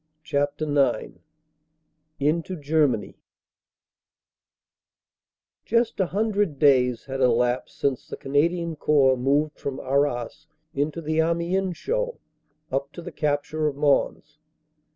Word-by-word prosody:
CHAPTER 145 Hz, +1 st, -1 dB, 0.3 s
IX -, -, -11 dB, 1.0 s
INTO 160 Hz, +6 st, 0 dB
GERMANY 150 Hz, -7 st, 0 dB, 2.4 s
JUST 230 Hz, -1 st, +1 dB
a 190 Hz, -, +2 dB
hundred 205 Hz, -5 st, 0 dB
days 125 Hz, -4 st, +3 dB
had 135 Hz, -1 st, -4 dB
elapsed 125 Hz, 0 st, +1 dB
since 135 Hz, -3 st, -1 dB
the -, -, -7 dB
Canadian 165 Hz, +4 st, 0 dB
Corps 140 Hz, -3 st, +3 dB
moved 145 Hz, +4 st, 0 dB
from 140 Hz, -2 st, -4 dB
Arras 140 Hz, +2 st, -1 dB, 0.3 s
into 150 Hz, +4 st, -2 dB
the 155 Hz, 0 st, -1 dB
Amiens 170 Hz, +3 st, 0 dB
show -, -, -2 dB, 0.5 s
up 140 Hz, +2 st, -2 dB
to 175 Hz, -, -9 dB
the -, -, -7 dB
capture 150 Hz, +1 st, -1 dB
of 145 Hz, -, -2 dB
Mons. 145 Hz, +1 st, 0 dB
150 Hz, 110 wpm, -25 LUFS, 135-170 Hz, 2.4 s, days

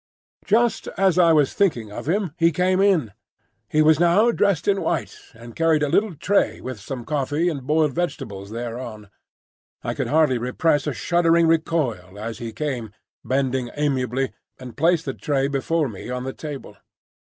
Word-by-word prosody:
Just 230 Hz, +2 st, +2 dB
as 190 Hz, -2 st, +3 dB
I 170 Hz, -2 st, +6 dB
was 150 Hz, -4 st, +3 dB
thinking 120 Hz, -, 0 dB
of 120 Hz, -, -6 dB
him 190 Hz, -2 st, 0 dB
he 170 Hz, -1 st, +3 dB
came 185 Hz, +3 st, +1 dB
in. 180 Hz, -, +3 dB, 0.6 s
He 155 Hz, 0 st, +3 dB
was 155 Hz, 0 st, +5 dB
now 185 Hz, +7 st, +4 dB
dressed 200 Hz, -7 st, +1 dB
in 195 Hz, -1 st, +2 dB
white, 145 Hz, -11 st, -2 dB, 0.2 s
and 115 Hz, 0 st, -12 dB
carried 160 Hz, -2 st, +2 dB
a 145 Hz, -, 0 dB
little 205 Hz, +2 st, +1 dB
tray 195 Hz, +7 st, +1 dB
with 130 Hz, -4 st, -7 dB
some 120 Hz, +3 st, -7 dB
coffee 150 Hz, +3 st, 0 dB
and 140 Hz, -6 st, -6 dB
boiled 155 Hz, -2 st, +2 dB
vegetables 125 Hz, -, -4 dB
thereon. 115 Hz, -2 st, -6 dB, 0.7 s
I -, -, -2 dB
could -, -, -3 dB
hardly 150 Hz, -5 st, +3 dB
repress 145 Hz, +4 st, 0 dB
a 150 Hz, -, -1 dB
shuddering 170 Hz, +1 st, +3 dB
recoil 150 Hz, -, 0 dB
as 110 Hz, +1 st, -6 dB
he 115 Hz, -1 st, -5 dB
came, 120 Hz, -3 st, -4 dB, 0.3 s
bending 130 Hz, -2 st, -1 dB
amiably, 135 Hz, -3 st, -1 dB, 0.2 s
and 125 Hz, -2 st, -10 dB
placed 165 Hz, +2 st, +2 dB
the 135 Hz, -, -3 dB
tray 140 Hz, -1 st, -1 dB
before 145 Hz, +3 st, 0 dB
me 110 Hz, 0 st, -8 dB
on 125 Hz, 0 st, -3 dB
the 130 Hz, 0 st, -4 dB
table. 145 Hz, -3 st, -8 dB
150 Hz, 170 wpm, -23 LUFS, 125-170 Hz, 0.7 s, I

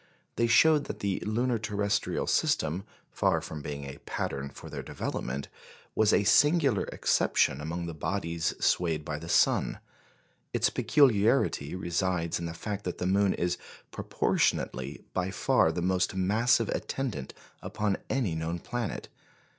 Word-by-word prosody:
They 115 Hz, -, +2 dB
showed 150 Hz, +5 st, +5 dB
that -, -, -7 dB
the 100 Hz, -2 st, -1 dB
lunar 120 Hz, +2 st, 0 dB
terrestrial 105 Hz, -2 st, -1 dB
system, 80 Hz, +6 st, +1 dB, 0.3 s
far -, -, +2 dB
from 75 Hz, -1 st, -7 dB
being 70 Hz, -1 st, -5 dB
a 70 Hz, 0 st, -8 dB
pattern 70 Hz, 0 st, -4 dB
for -, -, -11 dB
their -, -, -6 dB
development, 70 Hz, +3 st, -4 dB, 0.5 s
was 110 Hz, -1 st, +3 dB
a -, -, +4 dB
singular 145 Hz, -, +4 dB
exception 70 Hz, -, +1 dB
among 85 Hz, +3 st, -4 dB
the 85 Hz, -, -5 dB
bodies 85 Hz, 0 st, -2 dB
swayed 80 Hz, -4 st, +1 dB
by 75 Hz, -2 st, -4 dB
the 85 Hz, +1 st, -9 dB
sun. -, -, +3 dB, 0.8 s
Its -, -, +2 dB
peculiarity 115 Hz, -, +3 dB
resides 85 Hz, -2 st, -1 dB
in 85 Hz, -, -3 dB
the 85 Hz, -, -6 dB
fact 105 Hz, +2 st, -5 dB
that 90 Hz, -, -4 dB
the -, -, -3 dB
moon 100 Hz, +1 st, +2 dB
is 90 Hz, 0 st, -1 dB, 0.3 s
proportionately 65 Hz, +2 st, -1 dB
by 90 Hz, +1 st, -1 dB
far 85 Hz, -3 st, +2 dB
the 85 Hz, +1 st, -3 dB
most 95 Hz, +1 st, +1 dB
massive 110 Hz, +4 st, +2 dB
attendant 110 Hz, -, -3 dB, 0.3 s
upon 105 Hz, -2 st, -1 dB
any 120 Hz, -10 st, 0 dB
known 80 Hz, +2 st, -2 dB
planet. 120 Hz, +5 st, -4 dB
95 Hz, 145 wpm, -29 LUFS, 80-110 Hz, 0.8 s, showed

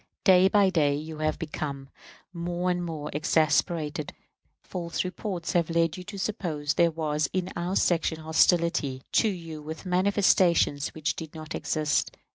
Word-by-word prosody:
Day 185 Hz, 0 st, +6 dB
by 200 Hz, -1 st, +4 dB
day 145 Hz, -5 st, +2 dB
you 155 Hz, +1 st, -6 dB
have 155 Hz, 0 st, 0 dB
become 145 Hz, -4 st, -5 dB, 0.5 s
more 175 Hz, +1 st, -1 dB
and 175 Hz, 0 st, -1 dB
more 155 Hz, -3 st, -5 dB
exasperated. 155 Hz, 0 st, +1 dB, 0.5 s
False 170 Hz, -2 st, -3 dB
reports 185 Hz, -2 st, -4 dB
have 170 Hz, -2 st, +2 dB
led 165 Hz, -1 st, +1 dB
you 180 Hz, -, -8 dB
to 205 Hz, +1 st, -8 dB
suppose 170 Hz, -8 st, -2 dB
there 170 Hz, 0 st, +4 dB
was 155 Hz, -2 st, -1 dB
in 185 Hz, 0 st, -1 dB
our 175 Hz, +2 st, -2 dB
section 165 Hz, -3 st, +1 dB
hostility 160 Hz, -4 st, +2 dB
to 225 Hz, -, +3 dB
you 165 Hz, -5 st, -6 dB
with 160 Hz, +4 st, -8 dB
manifestations 180 Hz, -5 st, +3 dB
which 155 Hz, 0 st, -1 dB
did 160 Hz, -1 st, -8 dB
not 155 Hz, 0 st, -7 dB
exist. 155 Hz, -1 st, -1 dB
165 Hz, 150 wpm, -27 LUFS, 155-180 Hz, 0.5 s, Day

